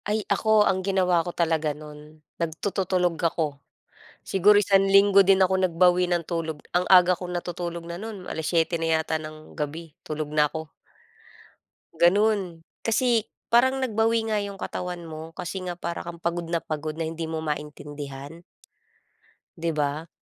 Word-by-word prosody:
Ay, 210 0 -1
ako 220 -1 +4
ang 190 -2 +1
ginawa 185 -3 +2
ko 170 - -5
talaga 160 -3 0
nun 150 0 -13 0.2
nagtututulog 180 +1 -1
ako. 155 -4 -1 0.7
Siguro 205 +2 +5
isang 195 -1 +4
linggo 195 0 +6
din 195 0 +4
ako 190 0 +3
nagbawi 180 0 +3
ng 170 -2 0
tulog, 165 -3 -3 0.2
ang 180 - +4
aga 180 -1 +7
kong 180 0 -7
natutulog 175 -1 -4
na 170 - -5
nun 200 -1 -7
7:00 165 +1 0
na 165 -1 +1
yata 160 0 -2
ng 155 0 -8
gabi 155 +1 -5
tulog 155 -1 -4
na 150 -1 +3
ako. 160 -1 -5 1.3
Ganun. 190 -2 +2 0.2
Kasi, 230 0 +2 0.2
parang 260 +3 +4
nag-bawi 225 -1 +1
nga 210 - +2
yung 200 -1 -5
katawan 180 -2 -5
mo 160 0 -9
kasi 190 +2 -5
nga 175 - -3
para 170 0 -5
kang 170 0 -8
pagod 170 0 -2
na 170 0 -1
pagod 155 0 -4
na 165 - -3
hindi 160 0 -4
mo 160 0 -4
maintindihan. 150 0 -6 1.1
Di 165 0 -1
ba? 150 +2 -1
170 Hz, 155 wpm, -25 LUFS, 160-195 Hz, 1.3 s, aga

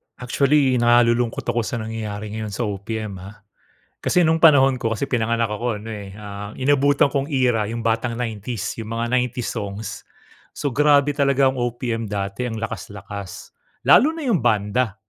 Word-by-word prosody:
Actually, 135 0 +2
nalulungkot 120 0 +3
ako 120 0 -1
sa - - -3
nangyayari 110 -2 -5
ngayon 110 -1 -5
sa 120 - -2
OPM 105 0 -4
ah. 100 +3 -12 0.6
Kasi 180 - +2
no'ng 160 0 +3
panahon 135 -5 +5
ko, 115 0 -1
kasi 110 - -4
pinanganak 115 -2 0
ako 110 0 -2
ano, 115 - -8
eh, 100 -2 -8
ah, 105 0 -8
inabutan 140 +1 +3
kong 140 -1 -1
era 125 -7 +1
'yong 115 0 -4
batang 115 +1 0
90s, 115 -2 -4
'yong 110 - -6
mga 115 +1 -2
90s 125 -1 0
songs. 105 -1 -6 0.5
So, 145 - -2
grabe 145 +1 +4
talaga 140 -1 +3
ang 130 - -6
OPM 120 -2 -2
dati, 100 +3 -3
ang 115 - -4
lakas-lakas. 100 -3 -7 0.3
Lalo 305 +5 +6
na 325 - -6
'yong 235 - +2
banda. 110 -1 +1
115 Hz, 165 wpm, -22 LUFS, 105-130 Hz, 0.6 s, Lalo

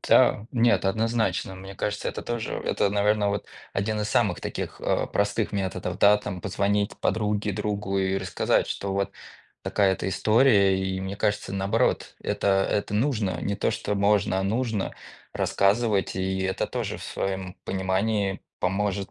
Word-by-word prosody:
Та 105 - +4
нет, 120 -4 +3
однозначно, 110 -2 0
мне 95 +1 -9
кажется, 105 +1 -2
это - - -5
тоже, 120 -2 -3
это, 100 -1 +1
наверно, 105 0 +2
вот 100 0 -2 0.3
один 105 +2 -1
из 105 - -1
самых - - +1
таких, - - -5
э, - - 0
простых 105 +2 0
методов, 95 -3 -3
да 105 +1 +7
там 95 -3 -5
позвонить 100 +2 0
подруге, 105 -1 0
другу 100 -1 -2
и 95 0 +1
рассказать, 95 -2 +1
что 100 -1 -3
вот 100 0 -1 0.5
такая-то 95 -2 +1
история. 105 -3 +4
И 95 0 -2
мне 95 +1 -4
кажется, 105 -1 -1
наоборот, 95 +1 0
это 95 -1 +1
это 105 0 -1
нужно, 105 - 0
не 100 0 -2
то, - - +1
что 105 -1 -2
можно, 100 -1 +2
а - - 0
нужно 110 0 -1 0.4
рассказывать, 100 -1 +1
и 95 0 -1
это 95 0 -1
тоже - - -3
в - - -10
своём 95 -1 -3
понимании 95 +1 0 0.2
поможет 100 +1 -1
100 Hz, 155 wpm, -26 LUFS, 95-105 Hz, 0.5 s, да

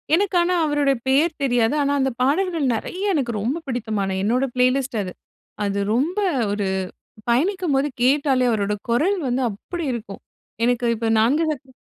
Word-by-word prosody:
எனக்கு 390 +1 0
ஆனா 360 +1 +1
அவருடைய 290 -2 +2
பெயர் 300 +5 +2
தெரியாது. 245 -1 +2
ஆனா, 285 0 +1
அந்த 265 0 +1
பாடல்கள் 325 +3 +1
நெறைய 380 - -2
எனக்கு 260 -6 0
ரொம்ப 255 +9 -1
பிடித்தமான, 215 -6 -2
என்னோட 250 +5 +2
பிளேலிஸ்ட் 255 0 +1
அது. 185 - -6 0.5
அது 200 0 -1
ரொம்ப 320 - 0 0.3
ஒரு 205 -1 -1 0.6
பயணிக்கும்போது 295 +1 +1
கேட்டாலே 265 -1 +3
அவருடைய 210 -1 -1
குரல் 325 +13 +2
வந்து 250 +2 0
அப்டி 325 - -6
இருக்கும். 215 -4 -7 0.4
எனக்கு 245 0 +1
இப்போது 225 0 0
4 275 +9 +3
சக்கர. 270 -3 -8
265 Hz, 145 wpm, -22 LUFS, 230-305 Hz, 0.6 s, கேட்டாலே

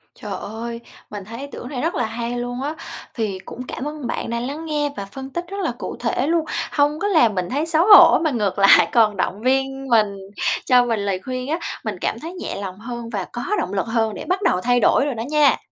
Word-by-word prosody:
Trời - - -8
ơi, 230 +2 -6 0.3
mình 205 -2 -7
thấy 230 +3 -8
ý 280 - -6
tưởng 245 - -7
này 255 -4 -4
rất 330 +3 -1
là - - 0
hay 235 +2 -4
luôn 245 +1 -4
á. 295 +3 -3 0.4
Thì 210 -5 -2
cũng 255 - -7
cảm - - -5
ơn 300 -5 -5
bạn - - -3
đã 235 - -1
lắng 285 +7 -5
nghe 295 -2 0
và 200 - -4
phân 265 +6 -8
tích 345 +5 -4
rất 395 +2 -6
là - - 0
cụ - - -5
thể 265 - 0
luôn, 330 0 +1 0.3
hông 295 +1 +2
có 410 - 0
làm 240 - +4
mình 180 -1 -2
thấy 290 +4 0
xấu 330 +2 +2
hổ 415 - +9
mà 315 - +2
ngược 205 -5 -1
lại 195 - +7
còn 215 -4 +3
động 195 +2 -2
viên 270 +2 0
mình, 215 -4 +3 0.5
cho 250 -1 +5
mình 225 -3 0
lời 190 -2 -1
khuyên 255 +1 -4
á, 325 +2 0 0.2
mình - - -3
cảm - - -1
thấy 335 +3 -7
nhẹ 370 - -5
lòng 190 0 -6
hơn 235 0 -6
và 200 -5 -3
có 240 - -4 0.2
động 200 - -3
lực 195 - 0
hơn 225 -1 0
để - - -7
bắt 370 +2 0
đầu 185 - +2
thay 245 0 +3
đổi 280 - +4
rồi 280 - -2
đó 225 - -3
nha. 300 -4 +4
245 Hz, 250 wpm, -21 LUFS, 220-295 Hz, 0.5 s, hổ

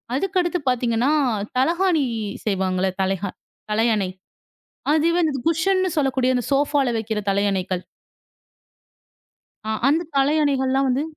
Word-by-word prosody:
அதுக்கு 380 +5 0
அடுத்து 350 0 -1
பார்த்தீங்க 240 -2 0
என்றால், 250 -7 +1
தலையணை 335 0 +2 0.4
செய்வாங்களே. 190 -2 0
தலைக 190 +1 -1 0.5
தலையணை 215 -3 +1 0.8
அது 315 +2 +3
வந்து 310 -5 +1
குஷன்னு 370 +3 +2
சொல்லக்கூடிய 260 -2 +1
அந்த 245 - 0
ஷோபாவில் 275 -3 +1
வைக்கிற 220 -1 -2
தலையணைகள். 195 -2 0 1.9
அ - - 0 0.2
அந்தத் 320 +3 0
தலையணைகள் 275 -1 +2
எல்லாம் 270 +1 +2
வந்து 260 +3 +1
265 Hz, 115 wpm, -22 LUFS, 215-310 Hz, 1.9 s, அது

